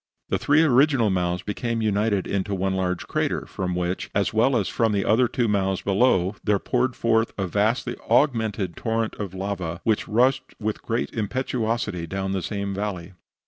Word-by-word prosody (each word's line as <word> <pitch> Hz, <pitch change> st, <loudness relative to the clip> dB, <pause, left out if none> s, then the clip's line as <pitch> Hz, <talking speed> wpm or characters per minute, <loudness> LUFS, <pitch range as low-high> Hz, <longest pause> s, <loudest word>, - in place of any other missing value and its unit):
The -, -, 0 dB
three 150 Hz, +3 st, +4 dB
original 135 Hz, -5 st, +4 dB
mouths 90 Hz, 0 st, -1 dB
became 115 Hz, +2 st, -2 dB
united 105 Hz, -2 st, +1 dB
into 100 Hz, 0 st, -1 dB
one 95 Hz, 0 st, 0 dB
large 90 Hz, -1 st, -1 dB
crater, -, -, -1 dB
from 90 Hz, -1 st, -3 dB
which, 90 Hz, +1 st, -2 dB
as 100 Hz, +1 st, +1 dB
well 120 Hz, +4 st, +3 dB
as 100 Hz, -, 0 dB
from 115 Hz, -2 st, +1 dB
the 100 Hz, -1 st, 0 dB
other 120 Hz, +3 st, +4 dB
two 120 Hz, 0 st, 0 dB
mouths 95 Hz, -2 st, 0 dB
below, 100 Hz, -2 st, +2 dB
there 105 Hz, -1 st, +2 dB
poured 125 Hz, +4 st, 0 dB
forth 115 Hz, 0 st, +1 dB
a 95 Hz, -, -1 dB
vastly 110 Hz, +6 st, 0 dB
augmented 110 Hz, -, +2 dB
torrent 115 Hz, -1 st, -1 dB
of 95 Hz, -3 st, -5 dB
lava, 95 Hz, -4 st, -3 dB
which 110 Hz, -2 st, +1 dB
rushed 130 Hz, +4 st, +1 dB
with 110 Hz, 0 st, -3 dB
great 115 Hz, +1 st, -2 dB
impetuosity 115 Hz, -5 st, -2 dB
down 95 Hz, +2 st, -3 dB
the 95 Hz, -1 st, -1 dB
same 100 Hz, +1 st, -3 dB
valley. 95 Hz, -3 st, -4 dB
105 Hz, 175 wpm, -24 LUFS, 95-115 Hz, -, three